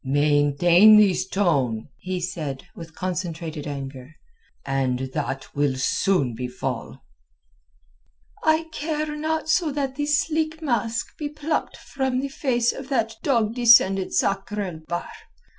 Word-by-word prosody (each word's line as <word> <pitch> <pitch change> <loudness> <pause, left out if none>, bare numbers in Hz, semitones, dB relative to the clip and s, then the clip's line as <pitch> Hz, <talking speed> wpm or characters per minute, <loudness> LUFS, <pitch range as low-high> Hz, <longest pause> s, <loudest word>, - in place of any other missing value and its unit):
"Maintain 145 +8 +5
this 200 -4 +3
tone," 135 - 0
he 185 0 -3
said, 155 -6 -4
with 165 -1 -10
concentrated 170 -4 -4
anger, 135 0 -7 0.5
"and 130 -1 -1
that 135 0 -4
will 145 -2 +1
soon 135 - +1
befall." 125 +2 -5 1.4
"I 315 +1 +3
care 305 -1 -3
not 315 +1 -2
so 315 0 +2
that 270 -2 -3
the 290 0 -1
sleek 310 +2 0
mask 230 -6 -2
be 295 -2 -3
plucked 300 +1 -3
from 265 -2 -2
the 275 +1 -3
face 245 -4 +1
of 270 0 -9
that 225 -5 0
dog 230 -6 +1
descended 225 -6 +5
Sakr 200 +1 0
el 180 -5 -5
Bahr. 175 0 -3
195 Hz, 125 wpm, -24 LUFS, -, 1.4 s, Maintain